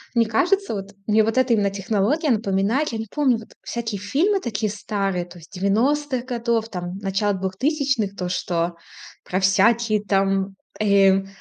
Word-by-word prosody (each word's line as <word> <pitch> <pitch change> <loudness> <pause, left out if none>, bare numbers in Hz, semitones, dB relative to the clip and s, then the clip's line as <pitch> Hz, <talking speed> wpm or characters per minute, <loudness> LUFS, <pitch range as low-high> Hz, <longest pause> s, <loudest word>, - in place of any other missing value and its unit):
Мне 230 -1 +4
кажется, 390 - +1
вот 195 0 -6 0.2
мне 215 +1 +4
вот 225 +3 -1
эта 255 -2 +3
именно 205 -2 +2
технология 210 - 0
напоминает, 215 +5 +1
я 225 - -4
не 225 - -5
помню, 270 -3 +2
вот 220 - -13
всякие 230 -4 -4
фильмы 335 - +1
такие 215 - -2
старые, 195 -3 -2
то 175 0 -14
есть 165 - -16
90-х 245 +7 0
годов, 235 -3 -1
там, 180 -2 -5
начала 200 +1 0
2000-х, 220 - -1
то, 180 -2 -3
что 175 -1 -1 0.5
про 185 - -1
всякие 210 +3 +3
там, 195 -1 +1 0.2
эм, 195 -2 +4
210 Hz, 160 wpm, -22 LUFS, 195-235 Hz, 0.5 s, Мне